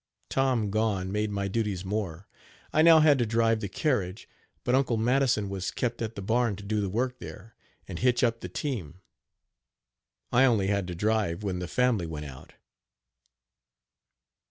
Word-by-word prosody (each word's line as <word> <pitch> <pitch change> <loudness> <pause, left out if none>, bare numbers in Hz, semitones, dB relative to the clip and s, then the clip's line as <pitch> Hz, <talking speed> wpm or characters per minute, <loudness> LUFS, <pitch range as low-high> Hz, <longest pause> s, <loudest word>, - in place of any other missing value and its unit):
Tom 125 -6 +1
gone 100 -3 0
made 105 +1 -1
my 100 -1 -2
duties 100 -3 -2
more. 95 -3 -4 0.5
I 155 - +4
now 160 -1 +7
had 150 -3 +5
to 120 - +2
drive 115 0 +2
the 100 - -4
carriage, 105 - -1 0.4
but 125 - 0
Uncle 130 -3 +2
Madison 120 -2 +2
was 95 -1 -3
kept 120 -1 -3
at 115 0 -3
the 100 - -6
barn 115 +1 +1
to 100 - -10
do 105 +1 -1
the 100 - -2
work 125 +5 -2
there, 110 +2 -10 0.3
and - - -6
hitch 125 0 +2
up 115 -1 +2
the 90 - -7
team 95 - -4 1.3
I 125 +2 +5
only 110 -7 +3
had 100 -2 0
to 90 - -5
drive 105 -2 0
when 95 -3 -2
the 90 - -4
family 120 -6 +1
went 75 -2 -6
out. 65 -2 -11
110 Hz, 170 wpm, -28 LUFS, 95-120 Hz, 1.3 s, now